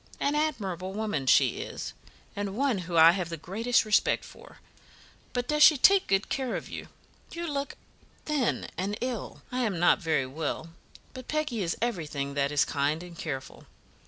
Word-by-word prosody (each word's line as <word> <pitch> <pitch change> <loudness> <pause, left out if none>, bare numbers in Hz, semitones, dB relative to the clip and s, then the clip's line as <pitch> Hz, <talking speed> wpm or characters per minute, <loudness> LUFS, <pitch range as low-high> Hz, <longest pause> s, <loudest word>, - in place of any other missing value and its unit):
An 285 - +1
admirable 195 - -2
woman 210 -10 -2
she - - +4
is, - - -6 0.4
and 200 0 -4
one 265 -6 +1
whom 170 -1 -3
I 165 +1 +9
have 180 -1 -3
the 165 - -5
greatest 225 +9 +1
respect 215 0 +2
for; - - -14 0.7
but 245 -1 -2
does 300 +1 0
she 300 -1 +8
take 390 +8 +5
good 195 +1 +1
care 260 -3 -2
of - - -5
you? - - -7 0.5
You 340 0 -4
look 285 -3 -3 0.5
thin 295 -5 0
and 200 +3 -2
ill." 250 -2 -4
"I 250 - -2
am 215 -7 0
not 175 - +4
very 160 -5 0
well, 155 +4 -4 0.4
but 255 -1 -9
Peggy 300 -8 -1
is 170 -2 -1
everything 150 -11 -2
that 140 0 0
is 145 0 +3
kind 150 +4 -1
and 175 -1 -11
careful. 135 -5 -6
195 Hz, 175 wpm, -28 LUFS, 165-255 Hz, 0.7 s, I